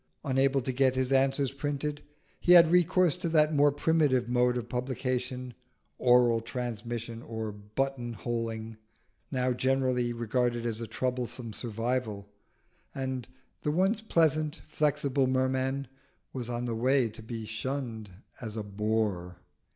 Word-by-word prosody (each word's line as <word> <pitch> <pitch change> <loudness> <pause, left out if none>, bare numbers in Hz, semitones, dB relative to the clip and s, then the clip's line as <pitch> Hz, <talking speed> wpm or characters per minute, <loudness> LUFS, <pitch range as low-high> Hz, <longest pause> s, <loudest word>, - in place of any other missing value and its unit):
Unable 135 0 +2
to 130 - -1
get 130 0 +2
his 130 0 0
answers 135 0 +2
printed, 145 +1 -3 0.4
he 180 - +5
had 170 -2 +8
recourse 180 -1 +4
to 180 -2 -2
that 155 -1 +4
more 145 0 +5
primitive 145 -4 +2
mode 125 0 +2
of 120 -1 -4
publication, 125 0 -3 0.5
oral 120 -2 +5
transmission 115 -1 -5
or 110 -2 -5
button 120 +4 -3
holding, 115 -1 -4 0.5
now 130 -2 +1
generally 130 -1 +1
regarded 120 0 -1
as 115 -1 -2
a 115 - -4
troublesome 125 -2 -3
survival, 115 -2 -2 0.7
and 130 -2 -3 0.3
the - - -1
once 190 +8 +2
pleasant, 155 -5 +1
flexible 140 -3 +1
Merman 130 +1 0 0.5
was 125 -3 -4
on 120 0 -2
the 120 - -2
way 130 +2 +2
to 110 0 -10
be 115 0 -6
shunned 110 -1 -4 0.3
as 110 -2 -5
a 110 - -2
bore. 100 -3 -1
125 Hz, 135 wpm, -29 LUFS, 115-135 Hz, 0.7 s, had